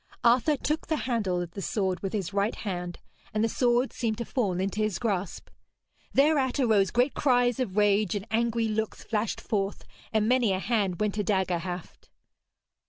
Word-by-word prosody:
Arthur 255 Hz, +5 st, +4 dB
took 305 Hz, +4 st, -2 dB
the 315 Hz, -, +1 dB
handle 205 Hz, -8 st, 0 dB
of 170 Hz, -, -9 dB
the 195 Hz, -, -6 dB
sword 190 Hz, -3 st, -1 dB
with 195 Hz, -, -3 dB
his 200 Hz, -3 st, -3 dB
right 200 Hz, +2 st, +1 dB
hand, 180 Hz, -4 st, -4 dB, 0.4 s
and 215 Hz, -, +2 dB
the -, -, +3 dB
sword 245 Hz, +2 st, +1 dB
seemed 225 Hz, -3 st, -1 dB
to 235 Hz, -, -3 dB
fall 200 Hz, -9 st, -1 dB
into 195 Hz, +3 st, -1 dB
his 215 Hz, -4 st, 0 dB
grasp. 195 Hz, -6 st, -2 dB, 0.6 s
Thereat 275 Hz, -2 st, +3 dB
arose 215 Hz, -7 st, +3 dB
great 245 Hz, +3 st, +2 dB
cries 245 Hz, -3 st, +2 dB
of 210 Hz, -6 st, -2 dB
rage, 205 Hz, -1 st, +3 dB
and 200 Hz, 0 st, -3 dB
angry 230 Hz, 0 st, +1 dB
looks 220 Hz, 0 st, -2 dB
flashed 215 Hz, -1 st, -1 dB
forth, 200 Hz, -2 st, -2 dB, 0.3 s
and 220 Hz, -1 st, +2 dB
many 245 Hz, -4 st, +3 dB
a 185 Hz, -, -1 dB
hand 200 Hz, -4 st, 0 dB
went 210 Hz, -1 st, 0 dB
to 210 Hz, -, -1 dB
dagger 190 Hz, -4 st, +1 dB
haft. 180 Hz, 0 st, -7 dB
215 Hz, 180 wpm, -28 LUFS, 195-240 Hz, 0.6 s, Arthur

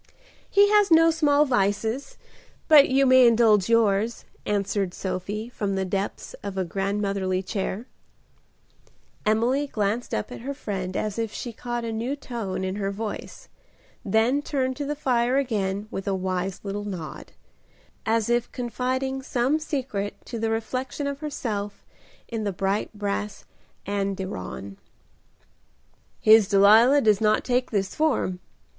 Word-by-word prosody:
"He 405 Hz, +1 st, +5 dB
has 415 Hz, -1 st, +5 dB
no 330 Hz, 0 st, +6 dB
small 300 Hz, -2 st, +3 dB
vices, 225 Hz, -, -1 dB, 0.5 s
but 295 Hz, -3 st, +7 dB
you 270 Hz, +1 st, +4 dB
may 255 Hz, -1 st, +7 dB
indulge 225 Hz, -4 st, +4 dB
yours," 225 Hz, 0 st, +2 dB, 0.2 s
answered 200 Hz, -2 st, -1 dB
Sophie, 195 Hz, +4 st, -4 dB
from 205 Hz, -5 st, -2 dB
the 190 Hz, 0 st, -1 dB
depths 195 Hz, +2 st, -3 dB
of 200 Hz, -1 st, -6 dB
a 190 Hz, -, 0 dB
grandmotherly 195 Hz, 0 st, -1 dB
chair. 195 Hz, +3 st, -3 dB, 1.4 s
Emily 245 Hz, +7 st, +2 dB
glanced 215 Hz, 0 st, -2 dB
up 105 Hz, -, -3 dB
at -, -, -7 dB
her 275 Hz, +3 st, -5 dB
friend 190 Hz, -7 st, -4 dB
as 215 Hz, +1 st, -2 dB
if 225 Hz, -2 st, -2 dB
she 240 Hz, +1 st, -6 dB
caught 240 Hz, +1 st, -4 dB
a 230 Hz, -, -3 dB
new 235 Hz, +5 st, -2 dB
tone 230 Hz, -9 st, -5 dB
in 190 Hz, +1 st, -3 dB
her 195 Hz, -1 st, -1 dB
voice, 210 Hz, +2 st, -6 dB, 0.6 s
then 225 Hz, +7 st, +2 dB
turned 260 Hz, -3 st, -1 dB
to 290 Hz, -, -3 dB
the 295 Hz, +1 st, -2 dB
fire 250 Hz, -2 st, +1 dB
again 205 Hz, -6 st, -1 dB
with 195 Hz, -, -5 dB
a 195 Hz, -, +1 dB
wise 185 Hz, 0 st, -3 dB
little 205 Hz, 0 st, -4 dB
nod, 180 Hz, -6 st, -7 dB, 0.7 s
as 225 Hz, -1 st, +1 dB
if 240 Hz, 0 st, 0 dB
confiding 260 Hz, +2 st, -2 dB
some 260 Hz, +3 st, 0 dB
secret 255 Hz, -10 st, -3 dB
to 235 Hz, -, -6 dB
the 225 Hz, 0 st, 0 dB
reflection 255 Hz, +5 st, -3 dB
of 280 Hz, 0 st, -3 dB
herself 210 Hz, -9 st, -4 dB, 0.4 s
in 225 Hz, -2 st, -4 dB
the 205 Hz, -, -1 dB
bright 195 Hz, +2 st, -1 dB
brass 205 Hz, 0 st, -3 dB, 0.4 s
andiron. 190 Hz, -, -4 dB, 1.4 s
"His 215 Hz, -2 st, +6 dB
Delilah 220 Hz, +8 st, +6 dB
does 215 Hz, -3 st, +3 dB
not 215 Hz, 0 st, +3 dB
take 250 Hz, 0 st, 0 dB
this 195 Hz, -3 st, -1 dB
form. 255 Hz, -12 st, 0 dB
220 Hz, 140 wpm, -25 LUFS, 195-255 Hz, 1.4 s, but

